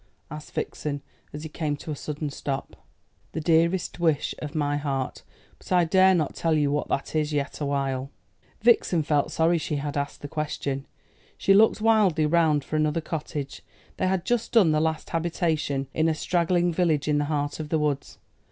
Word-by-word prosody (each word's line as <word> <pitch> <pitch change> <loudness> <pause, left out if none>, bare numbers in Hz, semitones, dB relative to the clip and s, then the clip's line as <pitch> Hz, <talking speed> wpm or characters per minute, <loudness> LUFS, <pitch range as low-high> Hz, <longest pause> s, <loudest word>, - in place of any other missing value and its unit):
asked 150 0 -9
Vixen, 145 -2 -3 0.3
as 150 +1 -7
he 155 - -6
came 150 -2 -2
to 155 - -7
a - - -2
sudden 150 0 -4
stop. 135 -1 -5 0.5
"The - - -2
dearest 170 +3 +1
wish 160 -4 +1
of 150 +1 -6
my 145 -1 0
heart. 135 -3 -3 0.4
But - - -15
I 180 -1 +5
dare 190 +2 +5
not 155 -4 0
tell 165 -1 +1
you 145 -2 +2
what 150 - -1
that 140 - -2
is 155 -1 +1
yet 145 0 -2
awhile." 135 -2 -1 0.5
Vixen 210 -7 +4
felt 145 -1 +2
very - - -11
sorry 165 +1 +2
she 150 - -3
had 145 0 -3
asked 140 0 -3
the - - -4
question. 145 -2 -3 0.5
She 195 - +4
looked 215 +2 +5
wildly 210 -8 +4
round 155 -2 +3
for 155 - -3
another 155 +1 +1
cottage. 150 -3 -5 0.4
They 185 - +1
had 185 -1 0
just 240 -2 -1
done 200 -9 +6
the 155 0 +2
last 160 -1 -2
habitation 160 -4 -1
in 160 +1 +2
a 160 - 0
straggling 175 +1 +1
village 160 -4 +1
in 150 -1 +2
the 145 - 0
heart 145 0 -2
of 155 -1 -5
the 160 - +2
woods. 150 -2 -2
155 Hz, 190 wpm, -26 LUFS, 145-170 Hz, 0.5 s, done